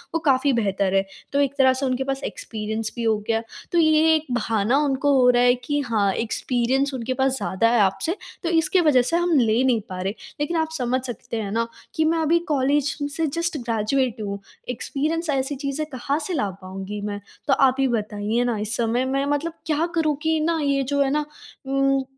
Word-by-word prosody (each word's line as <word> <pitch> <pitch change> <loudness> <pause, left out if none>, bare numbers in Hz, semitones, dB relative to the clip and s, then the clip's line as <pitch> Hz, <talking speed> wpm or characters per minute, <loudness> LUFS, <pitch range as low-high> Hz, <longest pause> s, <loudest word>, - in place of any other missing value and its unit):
वो - - +2
काफ़ी 275 -2 +3
बेहतर 195 -4 0
है, 195 0 +3 0.3
तो 280 - +2
एक 280 -1 +1
तरह 260 -1 +5
से 265 +1 -2
उनके 255 +1 0
पास 270 +1 -3
एक्सपीरियंस 220 0 -4
भी 235 - -3
हो 220 -1 +2
गया। 225 0 +1 0.3
तो 345 - +1
ये 315 0 +5
एक 310 - -1
बहाना 230 +1 +1
उनको 280 +1 +1
हो 250 -1 +5
रहा 245 0 +4
है 245 0 +6
कि 290 +4 -2
हाँ, 215 -6 +1
एक्सपीरियंस 255 +4 0
उनके 255 0 -2
पास 265 0 +1
ज़्यादा 230 +2 +1
है 235 -1 +3
आपसे 195 - +1 0.3
तो 335 - 0
इसकी 335 +2 +3
वजह 290 -6 +5
से 335 +7 0
हम 345 -3 +2
ले 230 +2 +3
नहीं 240 -4 +2
पा 185 0 -5
रहे। 195 +2 -2 0.3
लेकिन 325 +3 -1
आप 320 0 0
समझ 250 0 0
सकते 235 -1 -5
हैं 200 -1 -4
ना 230 +1 0 0.3
कि 315 - +2
मैं 330 +1 +2
अभी 330 +2 +3
कॉलेज 280 +1 +1 0.2
से 325 - 0
जस्ट 335 +1 -2
ग्रेजुएट 235 0 -1
हूँ, 200 -1 -4 0.3
एक्सपीरियंस 305 +7 -2
ऐसी 275 0 0
चीज़ें 285 +2 -2
कहाँ 275 +4 -1
से 365 - -3
ला 270 -10 0
पाऊँगी 195 +2 -6
मैं। 205 0 -4 0.3
तो 275 - +4
आप 265 -1 +4
ही 270 - +3
बताइए 215 0 -1
ना 240 -3 0
इस 215 +2 -2
समय 240 +2 +1
मैं 275 +1 0
मतलब 290 +3 -1
क्या 315 +1 +1
करूँ 310 -3 +2
कि 320 -1 +1
ना, 325 +1 +1
ये 275 -1 +1
जो 280 +2 0
है 270 - +2
ना 300 0 0 0.4
उम 275 0 +2
265 Hz, 215 wpm, -23 LUFS, 230-295 Hz, 0.4 s, है